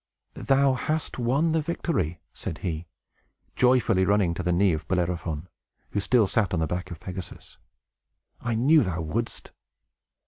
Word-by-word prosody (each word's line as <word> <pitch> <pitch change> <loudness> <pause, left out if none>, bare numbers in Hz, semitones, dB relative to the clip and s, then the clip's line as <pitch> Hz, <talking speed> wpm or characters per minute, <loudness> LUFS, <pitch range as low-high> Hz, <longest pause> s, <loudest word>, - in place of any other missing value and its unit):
"Thou 135 0 +3
hast 155 +2 -2
won 135 +7 +2
the 160 0 +2
victory," 150 - -2
said 80 - -5
he, 80 -1 -3 0.7
joyfully, 125 -7 +3
running 100 -3 +2
to 85 - -4
the 90 0 0
knee 90 +1 +3
of 80 0 -4
Bellerophon, 85 -3 -1 0.4
who 105 - 0
still 110 +3 +3
sat 100 -2 +1
on - - 0
the 80 - +1
back 90 +3 -3
of 85 -3 -8
Pegasus. 90 -1 -9 0.8
"I 120 -1 -2
knew 145 +7 +5
thou 90 -6 -1
wouldst." 115 +9 -4
95 Hz, 150 wpm, -26 LUFS, 85-125 Hz, 0.8 s, knew